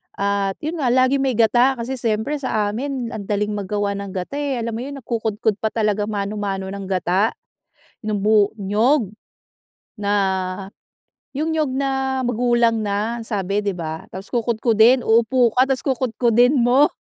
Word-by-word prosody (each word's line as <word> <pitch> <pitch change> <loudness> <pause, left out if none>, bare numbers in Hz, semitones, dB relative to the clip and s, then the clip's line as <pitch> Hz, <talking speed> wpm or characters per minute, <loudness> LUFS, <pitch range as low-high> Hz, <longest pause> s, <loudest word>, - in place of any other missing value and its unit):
At 200 -1 0
yun 320 +2 -3
nga 270 - 0
laging 255 +2 +3
may 260 -4 0
gata, 240 +4 +4
kasi 250 +2 -4
siyempre 230 +6 -1
sa 215 -6 -1
amin 255 0 -4
ang 210 -4 -6
daling 210 0 0
maggawa 205 0 -2
ng 200 -1 -6
gata 190 +11 -4
eh, 280 -2 -1
alam 230 - -2
mo 225 - -4
yun, 280 +2 -6
nagkukudkod 220 -2 -1
pa 220 - 0
talaga 210 -2 0
mano-mano 200 -2 -3
ng 200 -1 -6
gata 190 +2 +1 0.7
nung 210 -2 -1
bu 210 0 +3
niyog. 215 +4 +2 0.9
Na 200 -1 -1 1.3
yung 315 +3 -1
niyog 300 -4 0
na 265 0 -1
magulang 240 -1 +2
na, 210 +3 -1
ang - - -7
sabi, 200 -1 -1
'di 200 - 0
ba? 160 -1 -5
Tas 190 +2 -8
kukudkudin, 235 +1 +3
uupo 235 +1 +3
ka 255 - +6
tas 270 -1 0
kukudkudin 245 -1 +2
mo. 255 +4 +4
225 Hz, 160 wpm, -21 LUFS, 205-255 Hz, 1.3 s, ka